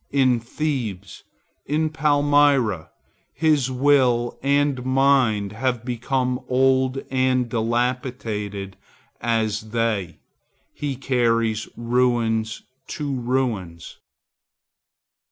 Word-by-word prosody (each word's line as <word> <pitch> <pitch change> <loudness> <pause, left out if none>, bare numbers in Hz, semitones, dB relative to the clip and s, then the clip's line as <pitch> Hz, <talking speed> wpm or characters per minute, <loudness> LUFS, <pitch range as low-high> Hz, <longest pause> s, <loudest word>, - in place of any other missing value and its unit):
In 130 -3 +3
Thebes, 115 -7 -4 0.4
in 155 +2 0
Palmyra, 145 - +2 0.5
his 150 -5 +2
will 130 -3 +2
and 140 -1 +1
mind 130 -6 +2
have 120 +1 -2
become 125 +1 -1
old 130 +1 +2
and 130 -1 +1
dilapidated 115 -4 -2 0.4
as 110 -2 -1
they. 110 -6 -1 0.6
He 145 -2 -3
carries 115 -4 0
ruins 115 -2 0 0.2
to 150 -4 -4
ruins. 120 -9 -3
125 Hz, 80 wpm, -22 LUFS, 115-135 Hz, 0.6 s, In